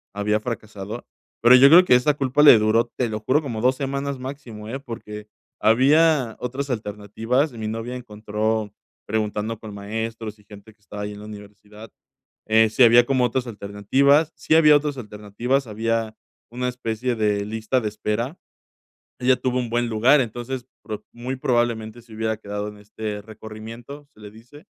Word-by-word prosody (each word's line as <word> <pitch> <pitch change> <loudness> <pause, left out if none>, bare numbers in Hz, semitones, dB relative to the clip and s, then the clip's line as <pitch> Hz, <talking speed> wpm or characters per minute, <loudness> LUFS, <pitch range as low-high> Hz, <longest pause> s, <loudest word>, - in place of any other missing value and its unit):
había 105 +1 0
fracasado, 110 -1 -6 0.4
pero 120 +2 +8
yo 130 +2 +8
creo 175 +4 +9
que 125 - +5
esta 125 +4 +3
culpa 135 +1 +1
le 145 -6 +9
duró, 115 +2 +2
te 125 -2 0
lo 110 0 -3
juro, 130 +8 +1
como 120 -7 -5
2 130 +2 +3
semanas 140 0 -3
máximo, 125 -5 -8
eh, 135 +4 -4
porque 105 -5 -9 0.3
había 135 +1 +3
otras 135 +3 -4
alternativas, 115 +5 -2
mi 110 -2 -5
novia 115 +3 -4
encontró, 110 -2 -3 0.4
preguntando 110 +1 -2
con 110 -2 -9
maestros 110 +1 -5
y - - -21
gente 100 +1 -14
que 105 - -45
estaba 105 0 -8
ahí 105 0 -5
en 100 - -10
la 105 - -10
universidad, 105 +1 -12 0.6
eh, 110 0 +4
si 125 - +3
había 120 +1 +6
como 130 -2 +2
otras 125 +1 -1
alternativas, 120 +8 +1
sí - - +1
había 150 -2 +7
otras 145 -1 -2
alternativas, 115 +4 -2
había 115 +1 -2 0.4
una 125 +1 -3
especie 125 0 -3
de 105 -2 0
lista 110 +4 -1
de 110 - -2
espera. 110 +7 -3 0.8
Ella 130 +1 +4
tuvo 125 -1 -1
un 120 -2 -3
buen 120 +1 0
lugar, 120 +6 +4
entonces, 120 +1 -5 0.2
pro 105 -1 -6
muy 125 +3 -5
probablemente 120 -2 -1
se 115 -1 -17
hubiera 110 0 -2
quedado 105 -1 -5
en 105 - -13
este 105 0 -6
recorrimiento, 110 +6 -10
se - - -23
le 105 -1 -10
dice, 125 - -16
115 Hz, 170 wpm, -23 LUFS, 105-125 Hz, 0.8 s, creo